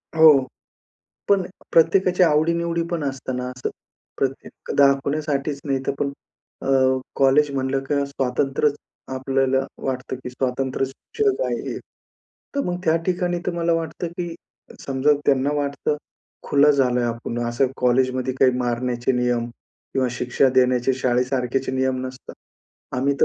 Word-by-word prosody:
हो. 155 Hz, -4 st, +7 dB, 0.8 s
पण 200 Hz, -1 st, +4 dB, 0.3 s
प्रत्येकाची 180 Hz, +2 st, +4 dB
आवडीनिवडी 170 Hz, +1 st, +2 dB
पण 170 Hz, -3 st, -2 dB
असताना 130 Hz, -2 st, -3 dB
असं. 125 Hz, 0 st, -4 dB, 0.5 s
प्रत्येक 135 Hz, 0 st, -4 dB
दाखवण्यासाठीचं 140 Hz, +1 st, +1 dB
नाही, 135 Hz, -1 st, +1 dB
तर -, -, +1 dB
पण 140 Hz, -1 st, -1 dB, 0.5 s
अ, -, -, -4 dB, 0.5 s
कॉलेज 140 Hz, +2 st, +4 dB
म्हणलं 135 Hz, 0 st, -1 dB
का 140 Hz, 0 st, 0 dB
स्वातंत्र्यचं 135 Hz, +1 st, -2 dB
आपल्याला 135 Hz, 0 st, +1 dB, 0.2 s
वाटतं, 130 Hz, 0 st, -3 dB
की 125 Hz, 0 st, -8 dB
स्वातंत्र्य 130 Hz, +1 st, -1 dB
शिक्षक 420 Hz, -, -2 dB
आहे. -, -, -3 dB, 0.8 s
तर 280 Hz, -, +1 dB
मग 175 Hz, 0 st, -1 dB
त्या 160 Hz, 0 st, +4 dB
ठिकाणी 180 Hz, -1 st, 0 dB
तर 180 Hz, -, 0 dB
मला 170 Hz, 0 st, +1 dB
वाटतं, 165 Hz, +1 st, -2 dB
की 170 Hz, 0 st, -5 dB, 0.5 s
समजा 135 Hz, +2 st, +2 dB
त्यांना 140 Hz, +1 st, +3 dB
वाटतं 140 Hz, +1 st, -1 dB, 0.5 s
खुलं 145 Hz, +1 st, +4 dB
झालंय 125 Hz, -4 st, +2 dB
आपण 115 Hz, 0 st, -3 dB
असं 120 Hz, +3 st, +2 dB
कॉलेजमध्ये 130 Hz, +1 st, +1 dB
काही 130 Hz, -, +6 dB
मारण्याचे 120 Hz, +1 st, 0 dB
नियम 125 Hz, -1 st, +1 dB, 0.5 s
किंवा 130 Hz, -1 st, +2 dB
शिक्षा 125 Hz, +2 st, +1 dB
देण्याचे 125 Hz, 0 st, +3 dB
शाळेसारखेचे 130 Hz, +1 st, 0 dB
नियम 130 Hz, -1 st, 0 dB
नसतात. 130 Hz, 0 st, -10 dB, 0.6 s
आम्ही 140 Hz, +2 st, +1 dB
तर -, -, +7 dB
135 Hz, 130 wpm, -22 LUFS, 130-150 Hz, 0.8 s, हो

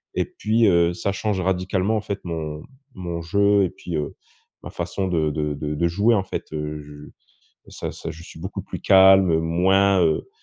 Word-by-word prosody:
Et -, -, +1 dB
puis, 110 Hz, +2 st, 0 dB
heu, 85 Hz, -2 st, +3 dB
ça 90 Hz, +3 st, -2 dB
change 100 Hz, -1 st, -2 dB
radicalement 95 Hz, +3 st, 0 dB
en -, -, -2 dB
fait 100 Hz, 0 st, -4 dB
mon 80 Hz, -3 st, -5 dB, 0.3 s
mon 85 Hz, -2 st, -5 dB
jeu 100 Hz, +3 st, +3 dB
et -, -, -2 dB
puis, 85 Hz, 0 st, -7 dB
heu, 75 Hz, -, -4 dB, 0.5 s
ma -, -, -8 dB
façon 95 Hz, -, -3 dB
de 80 Hz, -4 st, +1 dB
de 75 Hz, 0 st, -2 dB
de 75 Hz, +1 st, -4 dB
de 85 Hz, +3 st, +1 dB
jouer 100 Hz, +7 st, +2 dB
en 95 Hz, -, +1 dB
fait, -, -, -6 dB
heu, 75 Hz, 0 st, -4 dB
je 75 Hz, 0 st, -12 dB, 0.6 s
ça -, -, -6 dB
ça -, -, -7 dB
je 80 Hz, +2 st, -10 dB
suis 85 Hz, -, -12 dB
beaucoup 95 Hz, -, -5 dB
plus -, -, -8 dB
calme, 95 Hz, -3 st, +6 dB
moins, 95 Hz, +4 st, +3 dB
heu 80 Hz, -, +1 dB
90 Hz, 195 wpm, -23 LUFS, 80-95 Hz, 0.6 s, calme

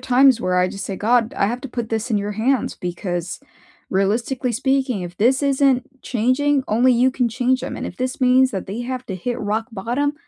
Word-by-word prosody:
times 255 Hz, -1 st, +4 dB
where 180 Hz, 0 st, +1 dB
I, 180 Hz, 0 st, +3 dB
just, 195 Hz, +1 st, -6 dB
say, 195 Hz, -1 st, -4 dB
"God, 235 Hz, +1 st, +2 dB
I 200 Hz, -, +1 dB
have 240 Hz, +3 st, -2 dB
to 270 Hz, -, -7 dB
put 235 Hz, -2 st, -4 dB
this 225 Hz, +2 st, -2 dB
in 210 Hz, -, +2 dB
your 205 Hz, +1 st, -3 dB
hands 240 Hz, +4 st, 0 dB
because 175 Hz, -1 st, -4 dB, 0.5 s
realistically 235 Hz, +6 st, 0 dB
speaking, 265 Hz, -4 st, 0 dB
if 175 Hz, 0 st, -8 dB
this 260 Hz, +6 st, +2 dB
isn't 270 Hz, -1 st, +1 dB
changing, 260 Hz, +4 st, +1 dB
only 245 Hz, +4 st, +4 dB
you 250 Hz, +2 st, +3 dB
can 250 Hz, -2 st, 0 dB
change 255 Hz, +2 st, 0 dB
'em, -, -, -5 dB
and -, -, -4 dB
if -, -, -8 dB
this 255 Hz, +1 st, -3 dB
means 255 Hz, +1 st, +4 dB
that 195 Hz, -6 st, -4 dB
they 210 Hz, +5 st, -5 dB
have 255 Hz, +1 st, -4 dB
to 190 Hz, -, -4 dB
hit 240 Hz, +7 st, -3 dB
rock 215 Hz, +2 st, -1 dB
bottom, 245 Hz, +8 st, -1 dB
245 Hz, 215 wpm, -21 LUFS, 205-260 Hz, 0.5 s, times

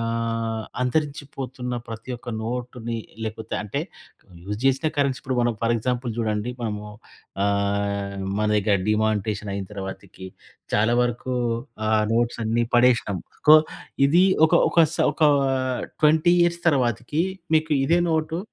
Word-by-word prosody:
ఆహ్, 115 Hz, -1 st, -2 dB, 0.2 s
అంతరించిపోతున్న 135 Hz, -3 st, -3 dB
ప్రతి 115 Hz, +3 st, -8 dB
ఒక్క 120 Hz, -, -13 dB
నోటుని 120 Hz, 0 st, -4 dB, 0.3 s
లేకపోతే 110 Hz, 0 st, -5 dB
అంటే 105 Hz, +7 st, -3 dB, 0.6 s
యూజ్ 105 Hz, +2 st, -4 dB
జేసిన 135 Hz, +3 st, +2 dB
కరెన్సీ 140 Hz, -2 st, +1 dB
ఇప్పుడు 130 Hz, -1 st, -3 dB
మనం 120 Hz, 0 st, +2 dB
ఫర్ 115 Hz, 0 st, +2 dB
ఎగ్జాంపుల్ 125 Hz, +1 st, -2 dB
జూడండి 110 Hz, 0 st, -1 dB
మనము 105 Hz, -2 st, -3 dB, 0.6 s
ఆహ్, 100 Hz, 0 st, -1 dB, 0.2 s
మన 105 Hz, -, +1 dB
దగ్గర 105 Hz, 0 st, +2 dB
డీమానిటైజేషన్ 105 Hz, -1 st, 0 dB
అయిన 100 Hz, -1 st, -4 dB
తర్వాతికి 95 Hz, -1 st, -8 dB, 0.5 s
చాలా 110 Hz, +3 st, +3 dB
వరకు 120 Hz, +1 st, -2 dB, 0.5 s
ఆ -, -, +1 dB, 0.2 s
నోట్స్ 120 Hz, +1 st, +1 dB
అన్నీ 115 Hz, +2 st, +1 dB
పడేషినం. 120 Hz, -5 st, +3 dB, 0.3 s
కొ 155 Hz, -, +11 dB, 0.5 s
ఇది 175 Hz, +6 st, +5 dB, 0.2 s
ఒక, 160 Hz, -, +1 dB, 0.2 s
ఒక -, -, -1 dB, 0.2 s
స -, -, -6 dB, 0.2 s
ఒక -, -, -4 dB, 0.8 s
20 155 Hz, +3 st, +4 dB
ఇయర్స్ 170 Hz, 0 st, +1 dB
తర్వాతికి 130 Hz, +1 st, +1 dB, 0.3 s
మీకు 155 Hz, 0 st, +2 dB
ఇదే 170 Hz, +5 st, +3 dB
నోటు 160 Hz, +1 st, 0 dB
120 Hz, 130 wpm, -24 LUFS, 105-135 Hz, 0.8 s, కొ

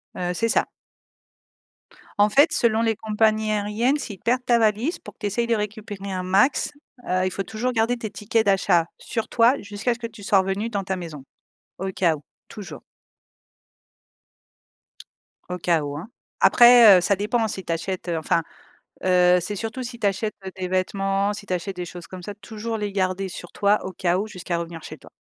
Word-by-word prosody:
Heu, 180 Hz, 0 st, -2 dB
c'est 230 Hz, +6 st, 0 dB
ça. -, -, +3 dB, 1.5 s
En 205 Hz, +1 st, +5 dB
fait, 285 Hz, +8 st, +5 dB
selon 225 Hz, -1 st, +2 dB
les 225 Hz, -1 st, +1 dB
compagnies 215 Hz, 0 st, +1 dB
aériennes, 215 Hz, +6 st, +1 dB
s'ils 210 Hz, -9 st, -7 dB
perdent 250 Hz, +4 st, 0 dB
ta 240 Hz, -1 st, +4 dB
valise, 225 Hz, -, +1 dB
pour -, -, -12 dB
que -, -, -49 dB
tu -, -, -3 dB
essayes 235 Hz, +4 st, -1 dB
de 235 Hz, -, +2 dB
récupérer 210 Hz, -2 st, -5 dB
un 185 Hz, -1 st, -3 dB
max, 195 Hz, +9 st, +2 dB, 0.4 s
heu, 185 Hz, 0 st, +1 dB
il 185 Hz, -, -1 dB
faut 195 Hz, -, -3 dB
toujours 220 Hz, +6 st, -2 dB
garder 230 Hz, +2 st, +1 dB
tes 225 Hz, -3 st, -5 dB
tickets 215 Hz, +2 st, 0 dB
d'achat 190 Hz, -4 st, +3 dB
sur 225 Hz, -2 st, -4 dB
toi, 235 Hz, +2 st, +4 dB
jusqu'à 205 Hz, +4 st, -2 dB
ce 235 Hz, -, -11 dB
que 235 Hz, -, -4 dB
tu 215 Hz, -3 st, -14 dB
sois 195 Hz, 0 st, +4 dB
revenue 195 Hz, +4 st, -1 dB
dans 200 Hz, -3 st, -2 dB
ta 190 Hz, 0 st, -2 dB
maison, 160 Hz, -6 st, -8 dB, 0.6 s
au 190 Hz, -, -3 dB
cas 170 Hz, -4 st, +2 dB
où, 145 Hz, -, -14 dB, 0.3 s
toujours 210 Hz, -3 st, -9 dB, 2.7 s
au 180 Hz, -, -3 dB
cas 170 Hz, -2 st, +1 dB
où, 145 Hz, 0 st, -5 dB
hein. 180 Hz, +10 st, -8 dB, 0.3 s
Après, 240 Hz, -5 st, +8 dB
heu, -, -, +2 dB
ça 200 Hz, +3 st, +2 dB
dépend 220 Hz, +3 st, 0 dB
si 190 Hz, -2 st, -5 dB
tu 170 Hz, -, -4 dB
achètes, 185 Hz, +2 st, -4 dB
heu, 165 Hz, -, 0 dB
enfin, 160 Hz, +1 st, +1 dB, 0.6 s
heu, 180 Hz, -1 st, +5 dB
c'est 200 Hz, +4 st, -4 dB
surtout 225 Hz, +5 st, -4 dB
si 240 Hz, -1 st, -7 dB
tu 210 Hz, -, 0 dB
achètes, 210 Hz, +2 st, -1 dB
heu 190 Hz, -, -5 dB
des 185 Hz, -1 st, -3 dB
vêtements, 195 Hz, +2 st, 0 dB
si 210 Hz, 0 st, -8 dB
tu 185 Hz, -, -4 dB
achètes 185 Hz, +2 st, -4 dB
des 180 Hz, -, -4 dB
choses 175 Hz, 0 st, -9 dB
comme 185 Hz, -1 st, -9 dB
ça, 205 Hz, +3 st, -6 dB
toujours 220 Hz, +2 st, -5 dB
les 210 Hz, -2 st, -3 dB
garder 190 Hz, 0 st, -1 dB
sur 175 Hz, 0 st, -9 dB
toi, 205 Hz, +1 st, +3 dB
au 190 Hz, -, -5 dB
cas 180 Hz, 0 st, 0 dB
où, 205 Hz, -, -2 dB
jusqu'à 185 Hz, -4 st, -4 dB
revenir 170 Hz, -1 st, -6 dB
chez -, -, -9 dB
toi. -, -, -16 dB
205 Hz, 200 wpm, -23 LUFS, 185-225 Hz, 2.7 s, Après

